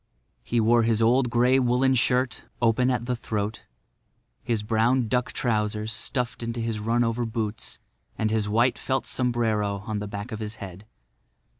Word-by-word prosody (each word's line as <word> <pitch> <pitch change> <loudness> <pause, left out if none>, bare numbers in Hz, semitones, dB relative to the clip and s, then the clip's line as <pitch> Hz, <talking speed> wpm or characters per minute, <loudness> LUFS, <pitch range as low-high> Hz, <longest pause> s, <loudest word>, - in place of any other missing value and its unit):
He 120 - -1
wore 115 +2 +4
his 115 -1 +2
old 120 +3 +3
grey 125 +3 +4
woolen 130 +1 +3
shirt, 125 0 +1
open 120 +2 +3
at 120 -2 0
the 125 0 -1
throat, 110 -2 -3 0.8
his 115 -3 -1
brown 115 +3 +2
duck 125 +2 0
trousers 110 -2 -1
stuffed 125 +3 -2
into 115 0 -3
his 115 -2 -2
run 115 +3 +1
over 115 +1 0
boots, 110 -1 -4 0.4
and 110 -1 0
his 110 -2 0
white 120 +4 +2
felt 130 -1 -1
sombrero 110 -5 0
on 110 -2 -2
the 105 - -4
back 100 +4 -6
of 110 - -5
his 110 0 -5
head. 100 0 -10
115 Hz, 165 wpm, -26 LUFS, 110-125 Hz, 0.8 s, wore